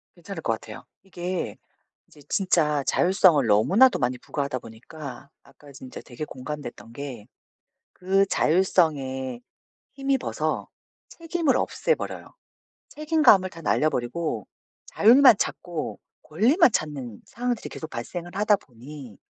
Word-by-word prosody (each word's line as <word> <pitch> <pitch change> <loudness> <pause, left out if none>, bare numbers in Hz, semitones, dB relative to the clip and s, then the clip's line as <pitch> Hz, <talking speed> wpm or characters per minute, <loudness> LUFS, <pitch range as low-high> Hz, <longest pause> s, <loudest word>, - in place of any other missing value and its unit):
괜찮을 - - -8
것 - - 0
같아요. - - -9 0.2
이게 180 -1 -4 0.5
이제 150 - -19
진짜 155 -7 +1
자율성을 175 - +4
너무나도 185 - +4
많이 125 0 0
부과하다 140 -3 -3
보니까 130 +4 -10
아까 145 -1 -17
진짜 130 -1 -10
되게 125 +5 -7
공감됐던 125 -5 -8
게 125 -6 -8 0.7
그 195 +2 +2
자율성에 145 -9 +1 0.5
힘입어서 270 0 -2 0.4
책임을 330 -5 0
없애 480 - 0
버려요. - - -8 0.6
책임감을 300 - +4
다 165 -2 -12
날려 155 +1 +2
버리고 120 - -3 0.4
자율만 240 +1 +6
찾고 170 -4 -4 0.2
권리만 245 - +3
찾는 135 - -3
상황들이 245 0 -3
계속 160 - -8
발생을 175 +2 -6
하다 210 0 +3
보니 130 - -12
160 Hz, 285 characters per minute, -25 LUFS, 130-200 Hz, 0.7 s, 자율만